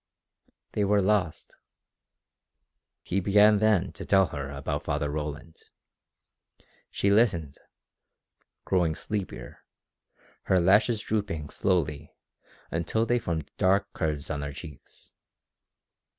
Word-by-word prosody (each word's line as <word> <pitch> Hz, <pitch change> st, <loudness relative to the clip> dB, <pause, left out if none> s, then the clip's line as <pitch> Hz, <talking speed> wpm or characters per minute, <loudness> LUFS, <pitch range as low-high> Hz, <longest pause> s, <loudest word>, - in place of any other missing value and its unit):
"They 105 Hz, -, 0 dB
were 100 Hz, +1 st, +3 dB
lost." 95 Hz, -4 st, -1 dB, 1.5 s
He 95 Hz, -, -1 dB
began 105 Hz, +2 st, +5 dB
then 105 Hz, -3 st, +2 dB
to -, -, -9 dB
tell 95 Hz, -1 st, +4 dB
her 70 Hz, -2 st, -5 dB
about 70 Hz, +1 st, -4 dB
Father 75 Hz, -1 st, -2 dB
Roland. 75 Hz, +2 st, -5 dB, 1.3 s
She 100 Hz, -, 0 dB
listened, 85 Hz, -, +2 dB, 1.1 s
growing 85 Hz, -4 st, +1 dB
sleepier, 105 Hz, +1 st, -6 dB, 0.8 s
her 95 Hz, -, +3 dB
lashes 105 Hz, +5 st, +3 dB
drooping 100 Hz, -10 st, -3 dB
slowly 75 Hz, -6 st, -1 dB, 0.6 s
until 85 Hz, +7 st, 0 dB
they 120 Hz, +1 st, +1 dB
formed 85 Hz, -7 st, -4 dB
dark 95 Hz, +2 st, +2 dB
curves 75 Hz, -4 st, -2 dB
on 75 Hz, -2 st, -3 dB
her 70 Hz, 0 st, -5 dB
cheeks. 75 Hz, -1 st, -13 dB
90 Hz, 105 wpm, -27 LUFS, 75-100 Hz, 1.5 s, began